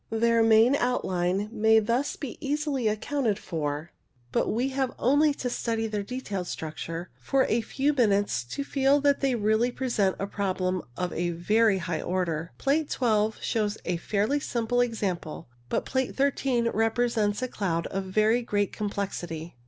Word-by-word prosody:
Their 230 +1 +3
main 225 +4 +5
outline 190 -5 0
may 220 -1 +4
thus 235 +6 +1
be 275 -6 -7
easily 285 -4 -1
accounted 220 +1 0
for, 155 -3 -4 0.4
but - - +1
we 245 +4 0
have 265 -1 -2
only 290 +4 +4
to 255 - -3
study 230 -2 -1
their 210 -2 -2
detailed 200 -5 -4
structure 165 +2 -5
for 270 -1 +2
a 230 - +1
few 280 +5 0
minutes 205 - +2
to 280 - -4
feel 275 +1 +2
that 285 0 +3
they 270 -2 +2
really 220 +2 +2
present 235 -7 0
a 195 - -2
problem 185 -2 -1 0.2
of 180 -1 -2
a 175 +1 -1
very 210 +5 +2
high 170 -3 -3
order. 175 -3 -2
Plate 290 +2 +1
12 220 -3 +1
shows 210 -2 0
a 180 - 0
fairly 210 +10 0
simple 245 -2 0
example, 190 - -2 0.2
but - - -1
Plate 260 -1 -1
13 265 -4 +1
represents 225 -1 +1
a - - 0
cloud 170 -8 -2
of 195 0 -3
very 215 +5 +2
great 205 -4 -1
complexity. 175 - -4
220 Hz, 160 wpm, -27 LUFS, 190-250 Hz, 0.4 s, main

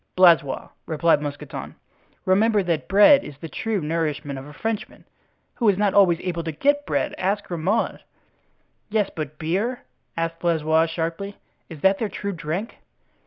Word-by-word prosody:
"Blaisois," 170 -7 +4 0.2
replied 160 -1 +2
Mousqueton, 145 -1 -6 0.5
"remember 205 +2 +3
that 170 -4 -1
bread 210 +9 +7
is 140 - -9
the 165 - -7
true 220 +5 -2
nourishment 150 -3 -2
of 135 - -10
a - - -10
Frenchman, 220 +7 -4 0.5
who 230 -4 +2
is 195 - +2
not 205 -1 +2
always 180 -5 +5
able 170 -2 -3
to 160 - -3
get 285 - +1
bread, - - 0
ask 200 +2 0
Grimaud." 180 +6 -1 0.9
"Yes, 210 -2 0
but 155 -1 -5
beer?" 200 +10 -1 0.4
asked 165 0 -2
Blaisois 160 -1 +2
sharply, 165 +5 -4 0.3
"is 160 -4 -10
that 195 0 +3
their 220 - -1
true 200 0 -4
drink?" 175 +7 -4
170 Hz, 155 wpm, -23 LUFS, 160-205 Hz, 0.9 s, bread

